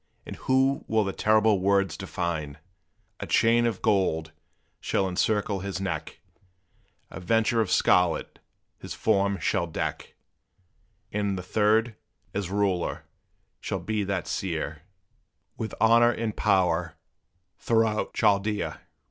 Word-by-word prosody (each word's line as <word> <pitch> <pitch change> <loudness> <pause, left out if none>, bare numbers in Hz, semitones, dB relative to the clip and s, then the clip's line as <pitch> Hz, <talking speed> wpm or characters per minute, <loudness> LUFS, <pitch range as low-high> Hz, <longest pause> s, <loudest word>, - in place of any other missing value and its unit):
And - - -7
who 135 +1 +1
will 110 -1 +2
the 95 -1 -3
terrible 110 -1 +3
words 100 0 +1
define? 80 -4 -4 0.6
A - - -6
chain 120 +1 +3
of 110 -5 -4
gold 90 -7 +1 0.5
shall 95 - 0
encircle 100 +2 0
his 95 0 -4
neck 95 -6 -4 0.9
A - - -7
vesture 115 +5 +2
of 105 - -1
scarlet 90 -3 +2 0.4
his - - -7
form 100 -2 +1
shall 85 +2 0
deck 80 - -4 1.0
And 100 -2 -1
the 90 - -5
third, 110 +4 +2 0.4
as 100 -3 -3
ruler, 95 -3 -1 0.5
shall - - -3
be 110 -1 -2
that 95 -4 -2
seer, 80 -3 -3 0.7
With 110 - -5
honor 115 +1 +5
and 115 -2 -3
power 85 -3 +1 0.6
throughout 110 -2 0
Chaldea!" 105 +1 0
100 Hz, 120 wpm, -26 LUFS, 90-110 Hz, 1.0 s, honor